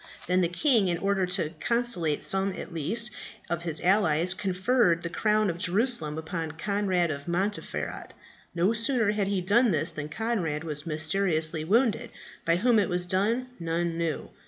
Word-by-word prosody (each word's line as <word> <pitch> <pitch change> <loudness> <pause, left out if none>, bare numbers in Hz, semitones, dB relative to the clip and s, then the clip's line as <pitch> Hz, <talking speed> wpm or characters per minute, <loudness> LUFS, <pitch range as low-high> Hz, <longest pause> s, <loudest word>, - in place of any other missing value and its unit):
Then 180 +1 +2
the 175 - +3
king, 220 - +2
in 175 -1 0
order 195 0 0
to 180 -4 +1
conciliate 235 -11 0
some 195 0 +1
at 180 - -8
least 215 +9 +1 0.4
of 170 -1 -1
his 165 -3 -2
allies, 180 -3 +3
conferred 190 -1 +1
the 170 - -4
crown 215 +3 +1
of 170 -2 -3
Jerusalem 180 - 0
upon 160 0 -4
Conrad 185 -1 0
of 140 +1 -6
Montferat. 190 +4 -3 0.4
No 180 +6 +2
sooner 230 -1 +2
had 210 -2 -1
he 195 -2 0
done 225 +7 +3
this 160 -1 +1
than 150 -1 -6
Conrad 170 -6 -2
was 150 -1 -4
mysteriously 160 0 0
wounded. 230 +5 +1 0.4
By 165 - +3
whom 225 +4 +3
it 200 - +1
was 180 0 0
done 215 +8 0
none 170 0 -1
knew. 165 -3 -3
180 Hz, 165 wpm, -27 LUFS, 165-210 Hz, 0.4 s, the